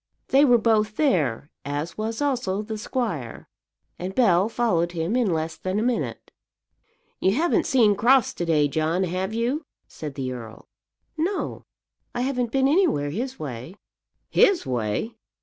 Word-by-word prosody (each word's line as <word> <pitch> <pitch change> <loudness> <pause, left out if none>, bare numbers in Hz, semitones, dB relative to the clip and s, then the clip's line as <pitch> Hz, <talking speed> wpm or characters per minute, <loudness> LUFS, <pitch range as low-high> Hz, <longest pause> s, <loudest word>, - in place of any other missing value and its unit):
They 275 +2 +6
were 245 -3 +6
both 215 -2 +2
there, 155 - +1
as 145 +4 -4
was 225 +5 -3
also 240 -8 -1
the 215 0 -5
squire, 210 - -3 0.5
and 185 +2 -5
Bell 195 -5 +4
followed 175 -8 0
him 170 +6 -1
in 240 -6 +2
less 160 0 -2
than 185 +1 -2
a 215 - +1
minute. 245 0 -2 0.9
"You 190 +2 +2
haven't 335 +3 +2
seen 230 -7 +4
Crofts 250 +5 +4
to 175 - -3
day, 150 -3 +3
John, 160 +5 0
have 185 +2 -2
you?" 240 +7 -1 0.2
said 150 -3 -8
the 130 -3 -3
earl. 115 -3 -9 0.5
"No; 365 +5 -2 0.5
I 245 - -1
haven't 250 -3 -1
been 270 +1 +3
anywhere 280 - +2
his 255 - -4
way!" 130 +4 -7 0.5
"His 395 -3 +3
way! 125 - -2
210 Hz, 150 wpm, -24 LUFS, 160-250 Hz, 0.9 s, They